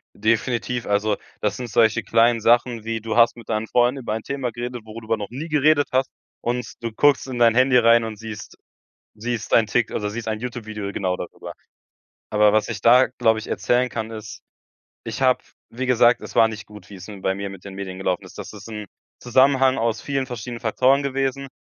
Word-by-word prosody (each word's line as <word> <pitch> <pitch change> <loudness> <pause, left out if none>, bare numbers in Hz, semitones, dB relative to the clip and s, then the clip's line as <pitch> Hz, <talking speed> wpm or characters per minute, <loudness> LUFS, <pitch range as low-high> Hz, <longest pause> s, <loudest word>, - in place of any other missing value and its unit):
Definitiv. 120 +2 0
Also, 105 +1 +1 0.2
das 105 - -1
sind 125 -2 -6
solche 110 -1 +3
kleinen 115 +1 +3
Sachen 120 0 +2
wie: 115 -1 -3
Du 110 +1 -3
hast 115 0 +5
mit 115 - -13
deinen 110 +1 -1
Freunden 125 +3 +2
über 110 - -3
ein 110 0 -4
Thema 135 -3 -3
geredet, 120 0 -6
worüber 110 +1 -3
du 105 - -6
noch - - -7
nie 145 +7 -6
geredet 150 0 +3
hast. 130 +1 +1 0.3
Und 120 -1 -3
du 115 - -3
guckst 140 +4 +3
in 125 -2 -5
dein 115 -1 +5
Handy 130 0 +5
rein 115 -1 +5
und 110 -1 -5
siehst 110 -1 -9 0.6
siehst 115 +1 -4
dein 110 -2 +4
Tik 120 +1 0
also 105 - -2
siehst 115 +2 -6
ein 110 -1 -2
YouTube-Video 110 -4 -5
genau 95 -2 -1
darüber. 90 - -8 0.8
Aber 105 -1 +4
was 110 +1 +2
ich 110 - -4
da, 125 +2 +6
glaube 115 -3 +1
ich, 110 - -9
erzählen 125 +1 +1
kann, 110 -1 -5
ist: 110 -1 -9 0.6
Ich - - -5
habe, 130 -1 +3 0.3
wie 125 +3 -4
gesagt 120 -1 +4
es - - -10
war 115 - +6
nicht 105 -2 -8
gut, 105 0 -14
wie's 95 -2 -10
bei 95 -2 -3
mir 100 0 -5
mit 95 -2 -12
den 100 -1 -9
Medien 95 -1 -6
gelaufen 90 -2 -1
ist. - - -14
Das - - -7
ist 105 +1 -11
'n 105 -2 -6 0.3
Zusammenhang 130 +1 +3
aus 115 0 -1
vielen 135 -2 -2
verschiedenen 120 -1 -6
Faktoren 130 +4 +2
gewesen. 135 0 -2
115 Hz, 210 wpm, -22 LUFS, 110-125 Hz, 0.8 s, da